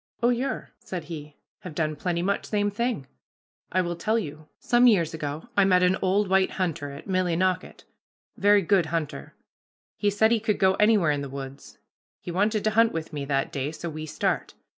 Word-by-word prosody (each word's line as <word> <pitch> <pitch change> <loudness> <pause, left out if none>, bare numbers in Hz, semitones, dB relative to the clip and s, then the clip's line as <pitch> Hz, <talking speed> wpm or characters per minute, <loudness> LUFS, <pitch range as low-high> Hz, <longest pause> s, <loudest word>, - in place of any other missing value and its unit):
"Oh, 240 - +5
yer," 250 +2 -2
said 180 -3 -6
he, 150 -3 -8 0.2
"have 180 -5 -9
done 155 -2 -1
pretty 170 +2 -2
much 200 +2 -1
same 205 -1 0
thing. 235 - -2 0.7
I 185 - +2
will 175 -1 -2
tell 220 +6 0
you. 155 -7 -5
Some 245 0 +4
years 170 -9 +3
ago 155 +3 -5
I 200 - +5
met 180 -1 +4
an 180 +1 +4
old 195 +2 +2
white 190 0 +3
hunter 165 -6 -2
at 140 +1 -10
Millinocket; 185 0 0 0.5
very 205 0 +4
good 180 -2 +3
hunter. 155 - -4 0.6
He 205 - +2
said 220 +2 +3
he 230 - +3
could 215 -1 0
go 190 0 +4
anywhere 210 -7 +4
in 145 -1 -1
the 140 - -5
woods. 135 0 -9 0.4
He 175 - -7
wanted 210 +4 +1
to 215 - +2
hunt 225 +1 +4
with 165 -1 -5
me 145 -2 -3
that 135 -1 0
day, 140 +1 -2
so 160 +1 -6
we 155 0 -6
start. - - -2
180 Hz, 195 wpm, -26 LUFS, 155-205 Hz, 0.7 s, Oh